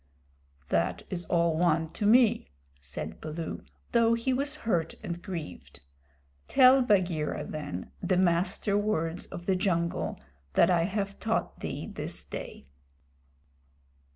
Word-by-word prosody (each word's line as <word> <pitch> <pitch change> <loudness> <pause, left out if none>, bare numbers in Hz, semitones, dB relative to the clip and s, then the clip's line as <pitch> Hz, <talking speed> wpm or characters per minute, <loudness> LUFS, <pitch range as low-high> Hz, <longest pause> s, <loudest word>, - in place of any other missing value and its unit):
"That 85 +1 0
is 175 -2 -3
all 170 -2 +2
one 160 -1 +2
to 205 - -1
me," 225 - +4 0.3
said 70 -1 -7
Baloo, 160 +1 -5 0.3
though 230 -1 +4
he 235 +3 0
was 285 +3 0
hurt 170 -7 0
and 170 0 -4
grieved. 175 -6 -7 0.7
"Tell 265 0 +7
Bagheera, 175 -10 +1
then, 95 - -6
the 185 - +1
Master 185 +3 +2
Words 175 -5 0
of 175 - -8
the 190 - +2
Jungle 170 -3 -1 0.3
that 185 - +5
I 170 -2 +3
have 200 +1 -3
taught 225 +1 -1
thee - - -4
this - - -5
day." - - -8
175 Hz, 125 wpm, -29 LUFS, 160-210 Hz, 0.7 s, Tell